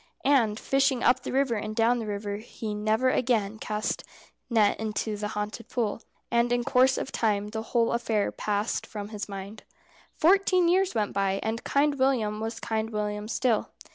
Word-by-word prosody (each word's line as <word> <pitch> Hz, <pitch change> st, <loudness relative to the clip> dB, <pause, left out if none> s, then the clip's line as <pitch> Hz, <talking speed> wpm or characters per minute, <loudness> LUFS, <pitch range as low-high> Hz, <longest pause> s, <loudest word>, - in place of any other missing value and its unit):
And 235 Hz, -7 st, +3 dB
fishing 270 Hz, -2 st, +1 dB
up 250 Hz, +1 st, +4 dB
the -, -, -5 dB
river 270 Hz, -2 st, +2 dB
and 215 Hz, 0 st, -3 dB
down 235 Hz, +2 st, +3 dB
the 225 Hz, -, -4 dB
river 205 Hz, 0 st, -3 dB
he 215 Hz, 0 st, -6 dB
never 215 Hz, +5 st, +1 dB
again 220 Hz, -4 st, 0 dB
cast 210 Hz, 0 st, -2 dB, 0.5 s
net 220 Hz, -4 st, +3 dB
into 215 Hz, 0 st, -2 dB
the 210 Hz, 0 st, -3 dB
haunted 210 Hz, +2 st, -5 dB
pool. 230 Hz, -3 st, -1 dB, 0.3 s
And 235 Hz, 0 st, +2 dB
in 245 Hz, 0 st, +2 dB
course 260 Hz, +1 st, +4 dB
of 265 Hz, -, -4 dB
time 210 Hz, -2 st, 0 dB
the 220 Hz, +1 st, -4 dB
whole 230 Hz, +1 st, +1 dB
affair 225 Hz, -3 st, 0 dB
passed 210 Hz, +1 st, -2 dB
from 205 Hz, -1 st, -6 dB
his 210 Hz, -2 st, -6 dB
mind. 200 Hz, +2 st, -7 dB, 0.6 s
Fourteen 370 Hz, +1 st, +4 dB
years 375 Hz, +2 st, +2 dB
went 210 Hz, -2 st, 0 dB
by, 195 Hz, 0 st, 0 dB
and 220 Hz, +1 st, -2 dB
Kind 285 Hz, 0 st, +1 dB
William 230 Hz, -6 st, +1 dB
was 225 Hz, +1 st, -4 dB
Kind 220 Hz, 0 st, -2 dB
William 210 Hz, -1 st, -3 dB
still. 230 Hz, -1 st, 0 dB
220 Hz, 175 wpm, -27 LUFS, 210-250 Hz, 0.6 s, up